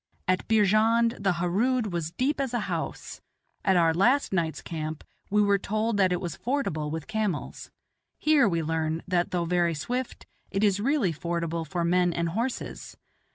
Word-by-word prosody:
At 185 0 +1
Beerjand 225 +2 +3
the 195 -2 +2
Harood 205 +6 0
was 165 -2 -2
"deep 270 - -1
as 260 -3 -2
a 240 - 0
house;" - - -4 0.4
at 190 -2 +3
our 165 -1 +4
last 240 - +2
night's 165 -4 0
camp 155 -2 -5 0.3
we 210 +1 +3
were 200 -1 +3
told 215 +2 -1
that 190 -2 +3
it 180 - +1
was 175 -4 -4
fordable 230 - -2
with 160 0 -4
camels; 220 -4 -3 0.5
here 295 -8 +4
we 165 -2 0
learn, 160 0 -1
that, 175 -1 +1
though 175 -1 -1
very 170 -1 +1
swift, 245 - -4 0.2
it 195 +2 -1
is 205 -1 +3
really 240 - +1
fordable 170 0 -3
for 175 -2 -2
men 175 0 +2
and 170 0 -1
horses. 230 +8 -4
185 Hz, 170 wpm, -27 LUFS, 170-225 Hz, 0.5 s, our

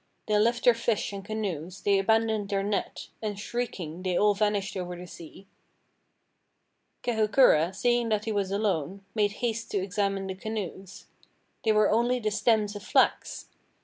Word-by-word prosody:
They 210 - 0
left 235 +3 +2
their 245 - +7
fish 230 -3 -1
and 195 -1 -6
canoes, 190 -5 -4
they 200 -1 +3
abandoned 220 0 +1
their 195 -1 0
net. 205 0 -3
And 210 -2 -3
shrieking 190 -8 -4
they 185 -1 0
all 210 0 +4
vanished 205 -1 0
over 180 -1 -4
the 175 +1 -9
sea. 170 +2 -12 1.6
Kahukura, 215 - +4
seeing 240 +1 +1
that 215 -1 0
he 225 - -1
was 200 -2 -1
alone, 195 -2 -1
made 205 -2 +1
haste 230 -1 -2
to - - -1
examine 195 0 -1
the 190 - -4
canoes. 195 -2 -6 0.6
They 220 - +3
were 215 -1 +4
only 240 +3 +2
the 215 -2 -1
stems 215 -1 +1
of 205 - -6
flax! - - +1
205 Hz, 160 wpm, -27 LUFS, 195-220 Hz, 1.6 s, their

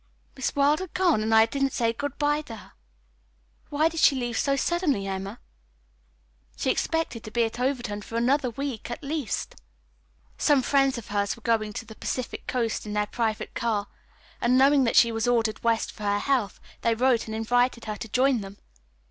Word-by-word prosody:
"Miss 265 - -2
Wilder 295 +6 +2
gone, 360 -9 +2
and 220 +1 -1
I 220 0 +7
didn't 275 +3 -1
say 230 -2 +1
good 285 +3 -5
bye 295 0 +1
to 240 -7 -9
her! 210 - -14 1.0
Why 300 +2 +2
did 330 0 -3
she 280 - +5
leave 240 -2 -2
so 275 +3 +1
suddenly, 290 - 0
Emma? 195 +3 -5 1.2
She - - +1
expected 325 -8 -2
to - - -7
be 235 +2 +1
at 230 +1 -3
Overton 245 -5 -1
for 225 - -9
another 255 +2 +2
week, 260 -2 -5
at 240 +6 -6
least." 285 -6 -3 0.8
"Some 285 -4 +3
friends 275 0 +2
of 235 - -8
hers 205 0 0
were 235 - -19
going 220 -2 +1
to 225 - -6
the 220 - -11
Pacific 250 +3 -5
Coast 230 -3 -1
in 210 - -4
their 210 0 +1
private 220 0 -2
car, 215 -4 -1 0.5
and 245 +2 +3
knowing 275 0 +5
that 230 - 0
she 235 - +6
was 225 +1 -1
ordered 230 -3 +1
west 230 -1 +1
for - - -15
her 205 0 +1
health, 240 -2 0 0.2
they 230 -1 +2
wrote 245 -1 +2
and 220 - -4
invited 245 +2 +1
her 215 -1 -4
to 225 - -7
join 255 +1 +2
them. 195 0 -9
240 Hz, 190 wpm, -26 LUFS, 220-275 Hz, 1.2 s, I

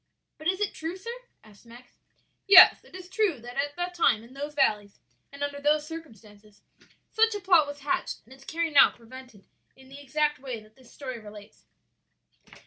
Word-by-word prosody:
"But 310 - -5
is 375 +1 0
it 415 -2 -1
true, 330 +3 -6
sir?" 460 +5 -7 0.3
asked 210 -2 -19
Max. 240 +1 -17 0.5
"Yes; 380 -2 +9
it - - -16
is 370 -1 -10
true 375 - 0
that 245 +1 -10
at 290 +1 -2
that 355 0 -4
time, 235 -10 +2
in 235 +3 -16
those 290 +2 -7
valleys, 210 -8 0 0.3
and 280 +1 -7
under 285 0 -4
those 300 +1 +1
circumstances, 215 - -13 0.5
such 450 -1 +2
a - - -3
plot 355 -6 +4
was 285 0 -9
hatched 285 - -3
and 245 - -16
its 270 0 -17
carrying 325 0 -3
out - - +7
prevented 240 -3 -14 0.3
in 265 0 -18
the 280 +1 -12
exact 295 +1 -1
way 255 -4 -6
that 215 0 -20
this 260 -2 -20
story 255 -4 -7
relates." 210 -1 -14
280 Hz, 190 wpm, -27 LUFS, 235-325 Hz, 0.5 s, Yes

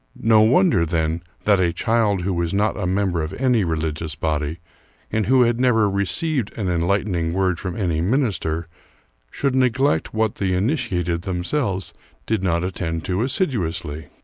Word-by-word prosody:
No 110 -1 +5
wonder, 115 - +4
then, 80 0 -1 0.2
that 100 -2 +4
a 90 -2 +2
child 110 -1 +1
who 95 +1 -1
was 85 +1 -1
not 105 +2 +1
a 100 -3 -2
member 95 -2 0
of 75 - -4
any 125 -5 +2
religious 80 -2 -2
body, 75 0 -2 0.5
and 110 -2 0
who 130 0 +5
had 120 0 +1
never 115 -4 +3
received 105 - -1
an 105 -4 -2
enlightening 85 -1 0
word 95 -2 0
from 90 -3 -5
any 85 -6 0
minister, 90 - 0 0.6
should 140 - -1
neglect 130 - +1
what 110 -1 0
the 95 -2 0
initiated 90 - -1
themselves 95 +2 -2 0.3
did 110 -3 0
not 85 -2 0
attend 85 -3 -3
to 95 +2 -1
assiduously. 85 - -1
95 Hz, 155 wpm, -22 LUFS, 85-110 Hz, 0.6 s, No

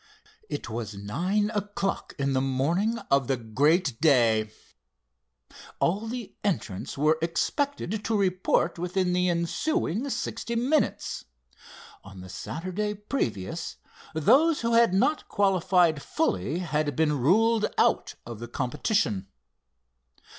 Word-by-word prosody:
It - - -4
was 110 -2 -5
nine 180 - -1
o'clock 205 -1 -3
in 140 -1 0
the 130 - +2
morning 165 - 0
of 140 -2 +3
the 135 - +1
great 130 - +1
day. 115 -8 +4 1.3
All 200 +6 +1
the 240 -2 -6
entrants 130 - -2
were 155 +2 +3
expected 215 - -1
to 225 - +1
report 185 -3 +1
within 180 +1 0
the 180 0 +2
ensuing 175 - -1
sixty 235 -2 -3
minutes. 265 +7 0 0.8
On 95 -1 -11
the 95 - -10
Saturday 185 - -4
previous 165 - -3 0.4
those 270 - +4
who 230 0 0
had 230 -3 +5
not 260 +11 +1
qualified 180 -5 +3
fully 95 - -1
had 150 -5 -1
been 150 -2 +1
ruled 215 - +3
out - - +2
of 115 -2 -8
the 120 - -6
competition. 120 - -1
170 Hz, 120 wpm, -27 LUFS, 135-210 Hz, 1.3 s, had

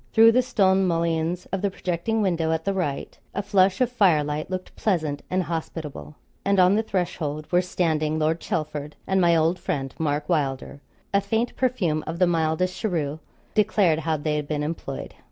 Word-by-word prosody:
Through 225 +1 +8
the 250 +2 +4
stone 195 -6 +2
mullions 165 +1 0
of 195 0 -1
the 200 - +1
projecting 185 +4 -1
window 165 -4 +1
at 160 0 -1
the 195 - +1
right, 160 -8 -3 0.2
a 200 - -1
flush 195 +1 +3
of 250 -1 +2
fire 185 -11 +4
light 150 +2 -3
looked 185 0 -5
pleasant 155 -8 -1
and 185 0 +1
hospitable, 160 -2 -5 0.3
and 200 -1 +2
on 180 +1 +6
the 220 - +3
threshold 170 -7 -2
were 175 0 +4
standing 160 -4 0
Lord 160 +1 +1
Chelford 150 -2 -3
and 190 0 +2
my 170 -1 +5
old 165 +3 +2
friend 135 -8 -3
Mark 150 -1 -1
Wylder; 140 -4 -1 0.3
a 200 - +4
faint 225 +4 -1
perfume 190 -12 0
of 165 - -3
the 180 - +4
mildest 170 +2 0
cheroot 160 -8 -1 0.3
declared 200 -6 +3
how 160 0 0
they 150 +1 -1
had 150 -1 -3
been 150 -1 -1
employed. 150 -3 -5
170 Hz, 185 wpm, -24 LUFS, 155-190 Hz, 0.3 s, Through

